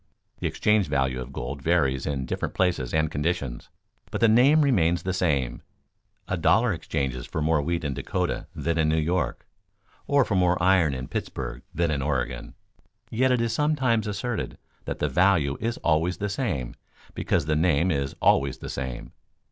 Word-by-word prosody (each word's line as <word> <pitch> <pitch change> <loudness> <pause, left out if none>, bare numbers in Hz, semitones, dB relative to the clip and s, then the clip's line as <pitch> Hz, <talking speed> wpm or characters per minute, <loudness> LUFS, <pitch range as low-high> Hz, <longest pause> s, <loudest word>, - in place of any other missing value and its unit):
The - - -1
exchange 105 -3 +2
value 65 -3 0
of 65 +1 -8
gold 65 +2 -5
varies 70 -5 +1
in 70 -2 -2
different - - -3
places 85 -10 0
and 80 -1 +1
conditions, 75 -5 -2 0.4
but - - -3
the 115 - +5
name 135 +8 +5
remains 85 - +2
the 95 - -1
same. 70 -9 0 0.7
A 95 - -1
dollar 110 +6 +3
exchanges 65 -6 -3
for - - -4
more 75 0 +2
wheat 85 +3 -2
in 70 -2 -1
Dakota 70 0 -2
than 85 0 -1
in 80 -1 +3
New 80 - +2
York 85 +3 -1 0.6
or 140 -3 +4
for - - -2
more 90 -1 +3
iron 90 -6 +3
in 65 0 -5
Pittsburg 60 +1 -5
than 85 -1 0
in 70 -2 -1
Oregon, 65 -3 -2 0.6
yet 130 +3 +2
it 125 -2 +2
is 115 -1 0
sometimes 130 -6 +1
asserted 105 +3 -3 0.3
that - - -4
the 75 - 0
value 80 -2 +3
is 115 +2 -2
always 85 +2 +2
the 105 - -2
same 90 - -2 0.4
because - - 0
the 75 0 +1
name 85 +2 +2
is 70 -3 -2
always 70 -1 +3
the - - -8
same. 65 -2 -5
80 Hz, 175 wpm, -26 LUFS, 70-100 Hz, 0.7 s, the